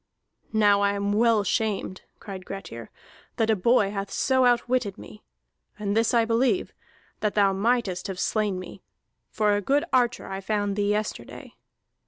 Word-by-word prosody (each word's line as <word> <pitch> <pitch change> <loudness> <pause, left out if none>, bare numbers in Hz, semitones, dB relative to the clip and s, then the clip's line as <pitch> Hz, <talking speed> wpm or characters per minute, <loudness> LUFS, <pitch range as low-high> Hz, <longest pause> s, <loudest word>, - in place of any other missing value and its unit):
"Now 205 -2 +4
I 200 0 +2
am 200 0 -1
well 225 -1 +3
shamed," 200 -1 -2 0.2
cried 195 -3 -8
Grettir, 150 -13 -8 0.5
"that 225 -2 +1
a - - +3
boy 205 0 +2
hath 200 -1 -4
so 260 -1 +2
outwitted 245 -3 +1
me! 210 - -12 0.6
And 205 -1 -2
this 225 0 +2
I 235 -2 +3
believe, 245 +10 +1 0.5
that 210 -1 -1
thou 200 -2 +4
mightest 200 -3 0
have 190 -2 -6
slain 210 -3 0
me; 185 - -9 0.5
for 210 -1 +1
a 205 - -1
good 280 +8 +1
archer 245 -2 +2
I 195 0 -5
found 205 0 -1
thee 205 0 0
yesterday. 210 +1 -4
210 Hz, 160 wpm, -25 LUFS, 200-230 Hz, 0.6 s, Now